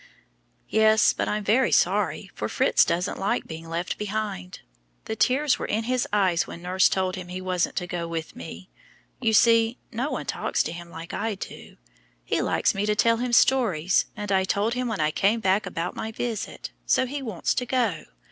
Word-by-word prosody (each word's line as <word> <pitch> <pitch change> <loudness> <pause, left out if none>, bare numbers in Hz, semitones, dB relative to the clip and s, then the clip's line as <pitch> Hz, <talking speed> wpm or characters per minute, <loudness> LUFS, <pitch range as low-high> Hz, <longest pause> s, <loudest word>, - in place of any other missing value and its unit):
"Yes, 220 0 +4
but - - -2
I'm 210 0 -1
very 230 +6 +3
sorry, - - +1
for - - -4
Fritz - - +3
doesn't 175 +3 -1
like 195 - 0
being 165 0 -8
left 170 +2 -3
behind; 205 -3 -4 0.4
the 220 - -3
tears 260 +7 +2
were - - -3
in 220 +2 -1
his 250 +1 0
eyes 190 -5 +2
when 170 - -9
nurse 185 +1 +3
told 185 -1 0
him 185 -2 -7
he 180 +1 -5
wasn't 185 -2 -1
to 180 - -2
go 175 -1 -4
with 165 -1 -5
me. 185 +3 -9 0.5
You 225 -3 +1
see, 230 +2 +4
no 250 +6 -2
one - - -4
talks - - 0
to - - -4
him 170 0 -8
like 165 0 -9
I 225 -2 -2
do. - - -10 0.5
He - - 0
likes - - +1
me 200 +2 -1
to 210 - +2
tell 230 +2 +3
him 245 +1 -2
stories, 200 -10 +3
and 205 -1 -4
I 190 -1 +3
told 205 +4 0
him 250 0 -2
when 225 -3 -3
I 155 0 +2
came 205 +7 +2
back 195 -1 +1
about 175 -1 -4
my 220 - -4
visit, 225 -1 -4 0.2
so 260 - +3
he 280 +3 -5
wants 220 -9 -1
to 250 - -2
go. 235 -11 0
205 Hz, 200 wpm, -25 LUFS, 180-230 Hz, 0.5 s, Yes